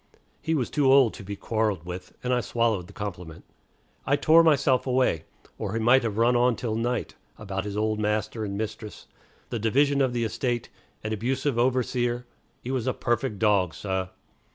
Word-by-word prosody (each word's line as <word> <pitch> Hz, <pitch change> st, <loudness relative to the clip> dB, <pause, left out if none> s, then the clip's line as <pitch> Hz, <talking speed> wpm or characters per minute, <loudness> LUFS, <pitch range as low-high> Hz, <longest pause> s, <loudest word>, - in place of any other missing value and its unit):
He 160 Hz, 0 st, 0 dB
was 130 Hz, -6 st, -1 dB
too 140 Hz, -3 st, +3 dB
old 135 Hz, -4 st, +6 dB
to -, -, -10 dB
be 100 Hz, +1 st, -6 dB
quarreled 105 Hz, -5 st, -1 dB
with, 90 Hz, +1 st, -8 dB
and 125 Hz, 0 st, 0 dB
I 125 Hz, -, +2 dB
swallowed 115 Hz, -7 st, 0 dB
the -, -, -13 dB
compliment. 90 Hz, -7 st, -7 dB, 0.6 s
I 140 Hz, -, +2 dB
tore 160 Hz, +3 st, +5 dB
myself 135 Hz, -5 st, +3 dB
away, 125 Hz, -, +1 dB, 0.3 s
or 105 Hz, -2 st, -3 dB
he 115 Hz, -, 0 dB
might 120 Hz, +4 st, +5 dB
have 110 Hz, -3 st, -3 dB
run 120 Hz, +2 st, +4 dB
on 120 Hz, 0 st, +3 dB
till 115 Hz, -2 st, -3 dB
night 120 Hz, +2 st, -2 dB, 0.2 s
about 95 Hz, -2 st, -4 dB
his 105 Hz, 0 st, -4 dB
old 110 Hz, 0 st, 0 dB
master 105 Hz, +1 st, -1 dB
and 100 Hz, -1 st, -4 dB
mistress, 110 Hz, 0 st, -6 dB, 0.5 s
the 120 Hz, -, -2 dB
division 140 Hz, +6 st, +2 dB
of 130 Hz, -2 st, +2 dB
the 120 Hz, -1 st, -1 dB
estate, 120 Hz, +1 st, -2 dB, 0.3 s
an 110 Hz, 0 st, -2 dB
abusive 125 Hz, +3 st, -1 dB
overseer 125 Hz, -1 st, 0 dB, 0.4 s
("he 125 Hz, -, -4 dB
was 130 Hz, -2 st, -1 dB
a 130 Hz, -, +1 dB
perfect 120 Hz, -2 st, -1 dB
dog, 100 Hz, -5 st, +2 dB
sah!") 95 Hz, -2 st, -2 dB
115 Hz, 185 wpm, -26 LUFS, 105-125 Hz, 0.6 s, old